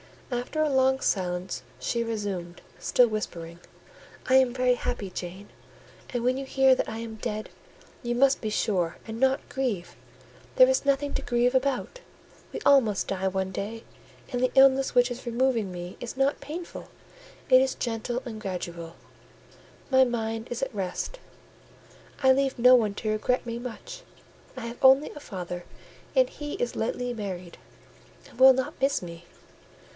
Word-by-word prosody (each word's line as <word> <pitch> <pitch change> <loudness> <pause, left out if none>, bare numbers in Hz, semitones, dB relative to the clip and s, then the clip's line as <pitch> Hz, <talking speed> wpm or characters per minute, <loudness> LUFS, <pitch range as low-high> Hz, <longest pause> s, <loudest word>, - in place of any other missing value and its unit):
After 250 +6 -1
a 305 - +1
long 265 -1 +3
silence, 180 -1 -1 0.2
she 235 -1 -1
resumed, 200 -6 -4 0.2
still 245 - +4
whispering— 170 -6 -5 0.7
"I 260 - +4
am 260 -2 +5
very 250 0 +3
happy, 230 -5 -3
Jane; 185 +3 -7 0.6
and 245 -2 -3
when 255 +1 +2
you 270 - -4
hear 265 0 +4
that - - -1
I 220 - -5
am 225 -1 -6
dead, 215 0 -4 0.5
you 240 -1 -2
must 275 +2 +3
be 220 - -2
sure 180 -5 0
and 225 0 -6
not 265 +2 +2
grieve: 240 -10 -3 0.6
there - - +7
is - - +1
nothing 280 +1 +1
to - - -1
grieve 240 +1 +1
about. 270 - 0 0.5
We - - -6
all 280 -1 +7
must 210 -5 -2
die 190 -1 -1
one 190 0 -1
day, 215 +4 -5 0.5
and 245 -2 -1
the 255 - +2
illness 270 0 +5
which 245 0 +4
is 245 +2 -7
removing 235 -4 +1
me 175 0 -7
is 245 +1 -7
not 270 +1 +1
painful; 320 +5 -7 0.6
it 255 0 +7
is 265 0 0
gentle 240 +1 -3
and 220 -3 -7
gradual: 175 -4 -5 1.0
my 260 0 +6
mind 225 -2 -2
is 240 +2 -3
at 270 - -3
rest. 195 - -4 1.0
I 265 - +7
leave 270 0 +1
no 250 +1 +7
one 215 -5 +3
to 215 0 -2
regret 245 +4 0
me 235 0 -4
much: 245 -2 -8 0.6
I - - -5
have 235 +1 -6
only 265 +3 +6
a - - -10
father; 180 -8 -6 0.5
and - - +5
he 295 -12 -7
is 245 - -2
lately 245 +2 -2
married, 185 -6 -6 0.7
and - - -17
will 265 0 +9
not 260 0 -3
miss 275 +1 +2
me. 170 0 -9
240 Hz, 165 wpm, -27 LUFS, 205-265 Hz, 1.0 s, will